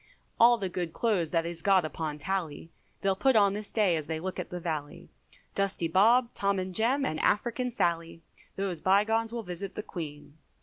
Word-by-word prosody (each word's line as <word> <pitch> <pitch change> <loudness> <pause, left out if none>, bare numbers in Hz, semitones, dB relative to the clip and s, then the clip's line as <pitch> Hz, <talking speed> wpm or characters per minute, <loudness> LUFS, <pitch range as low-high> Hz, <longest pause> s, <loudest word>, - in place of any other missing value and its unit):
All 240 +1 +7
the 195 -4 -3
good 175 -2 -4
clothes 200 -9 0
that 165 0 0
is 170 -1 -5
got 190 -2 +4
upon 155 -1 -4
tally, 165 -1 -3 0.3
They'll 195 -1 +1
put 265 +6 +2
on 200 -2 +5
this 210 0 -4
day 205 -6 +2
as 155 -2 -4
they 160 0 -3
look 185 +3 -5
at - - -5
the 180 - -5
valley, 155 -4 -5 0.4
Dusty 195 -4 0
Bob, 230 +8 +4
Tom, 200 0 +1
and 185 0 -3
Jem, 255 +8 +2
and 155 - -2
African 240 +4 +1
Sally, 165 -6 -1 0.3
These 190 -5 -3
bye 195 +2 +4
gones 225 +1 0
will 235 -1 -4
visit 180 +1 -6
the 210 - -4
Queen. 150 -5 -8
190 Hz, 200 wpm, -29 LUFS, 165-215 Hz, 0.4 s, All